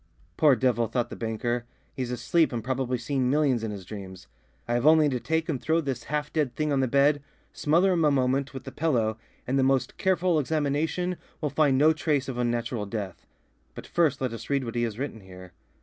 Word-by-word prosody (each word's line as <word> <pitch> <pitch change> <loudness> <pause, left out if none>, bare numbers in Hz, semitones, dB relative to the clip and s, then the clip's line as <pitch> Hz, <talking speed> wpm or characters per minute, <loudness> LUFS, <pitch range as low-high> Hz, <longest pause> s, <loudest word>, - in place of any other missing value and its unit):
"Poor 145 -4 +5
devil," 120 -3 +1
thought 120 +1 -2
the - - -5
banker, 120 +1 -2 0.3
"he's 130 -2 -4
asleep 125 +7 +1
and 120 -3 -3
probably 130 0 -1
seeing 130 +1 -1
millions 135 -5 +2
in 110 - -2
his 100 -3 -7
dreams. 95 -2 -9 0.4
I 120 - -1
have 120 +4 +2
only 155 -1 +6
to 130 -2 -1
take 160 +4 -1
and 140 -6 -2
throw 160 +1 +2
this 135 -6 -3
half 150 0 -3
dead 145 -6 0
thing 150 -1 -1
on 135 - +2
the 130 - +2
bed, 140 +3 +3 0.3
smother 170 +6 +3
him 170 -2 +1
a 150 - +5
moment 135 0 +1
with 135 - -8
the - - -8
pillow, 115 -9 0 0.3
and 135 +2 0
the - - +3
most 130 -1 +1
careful 185 -3 +2
examination 155 +5 -1 0.2
will 150 -3 -2
find 145 -4 +3
no 155 +3 +5
trace 150 -3 0
of 125 -2 -4
unnatural 120 -2 -1
death. 100 -3 -6 0.5
But, - - -8
first, 155 -7 +1
let 130 -3 -1
us 115 0 -8
read 140 -1 +1
what 115 -2 -5
he 120 - -1
has 115 -3 -2
written 130 -4 -4
here." 90 -1 -12
130 Hz, 215 wpm, -27 LUFS, 120-150 Hz, 0.5 s, only